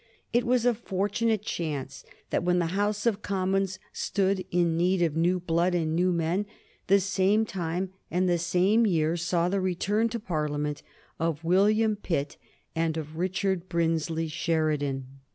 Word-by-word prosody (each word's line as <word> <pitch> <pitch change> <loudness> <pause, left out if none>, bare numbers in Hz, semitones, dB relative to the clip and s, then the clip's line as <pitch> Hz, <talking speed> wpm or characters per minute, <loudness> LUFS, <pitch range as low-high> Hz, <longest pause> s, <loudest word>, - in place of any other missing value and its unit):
It 240 0 +3
was 245 -1 +2
a 245 - +4
fortunate 210 0 -1
chance 145 -9 -4 0.3
that - - +1
when 180 0 +2
the 175 - +2
House 205 +2 0
of 215 -3 +1
Commons 190 -1 0 0.2
stood 195 -1 0
in 175 -2 +2
need 180 +2 +2
of 160 -3 0
new 175 +3 +2
blood 175 +1 +1
and 160 -2 0
new 180 +2 +2
men 175 +4 0 0.4
the 200 +1 +5
same 200 +2 +2
time 185 -3 -3 0.2
and 185 +2 +1
the 175 -1 +2
same 185 +7 +3
year 165 -3 +1
saw 170 0 0
the 195 +1 0
return 200 +5 +1
to 235 +1 -3
Parliament 150 -5 -2 0.4
of 165 -1 -1
William 210 +5 +3
Pitt 150 -8 -3 0.4
and 165 -1 0
of 155 0 -6
Richard 185 0 -1
Brinsley 165 -1 0
Sheridan. 155 -4 -1
180 Hz, 155 wpm, -27 LUFS, 165-195 Hz, 0.4 s, the